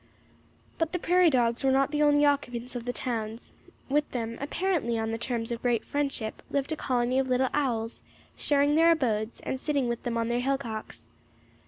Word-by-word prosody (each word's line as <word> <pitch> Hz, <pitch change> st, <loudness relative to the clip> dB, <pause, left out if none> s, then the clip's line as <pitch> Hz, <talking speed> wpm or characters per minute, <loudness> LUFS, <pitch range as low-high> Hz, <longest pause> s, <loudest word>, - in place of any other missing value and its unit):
But 325 Hz, +1 st, 0 dB
the -, -, +1 dB
prairie 360 Hz, 0 st, +4 dB
dogs 240 Hz, -2 st, +1 dB
were 270 Hz, -, +4 dB
not 270 Hz, +1 st, +2 dB
the 300 Hz, 0 st, 0 dB
only 290 Hz, 0 st, +5 dB
occupants 250 Hz, -4 st, -1 dB
of 240 Hz, -1 st, -5 dB
the 245 Hz, -, -1 dB
towns; 230 Hz, -2 st, -4 dB, 0.4 s
with 295 Hz, +2 st, +1 dB
them, 230 Hz, -2 st, -3 dB
apparently 300 Hz, -6 st, 0 dB
on 225 Hz, 0 st, -1 dB
terms 235 Hz, -1 st, -2 dB
of 235 Hz, -, -3 dB
great 240 Hz, -2 st, +1 dB
friendship, 275 Hz, -6 st, -2 dB
lived 280 Hz, +2 st, -1 dB
a -, -, +1 dB
colony 250 Hz, -2 st, 0 dB
of 265 Hz, -1 st, 0 dB
little 255 Hz, +1 st, +2 dB
owls, 235 Hz, -6 st, -1 dB, 0.3 s
sharing 285 Hz, 0 st, +2 dB
their 330 Hz, +2 st, +6 dB
abodes, 225 Hz, -7 st, -1 dB
and 260 Hz, -, -3 dB
sitting 280 Hz, -3 st, 0 dB
with 235 Hz, 0 st, -2 dB
them 235 Hz, -1 st, -2 dB
on 230 Hz, 0 st, 0 dB
their 240 Hz, 0 st, +1 dB
hillocks. 245 Hz, -4 st, -3 dB
255 Hz, 185 wpm, -28 LUFS, 235-290 Hz, 0.4 s, their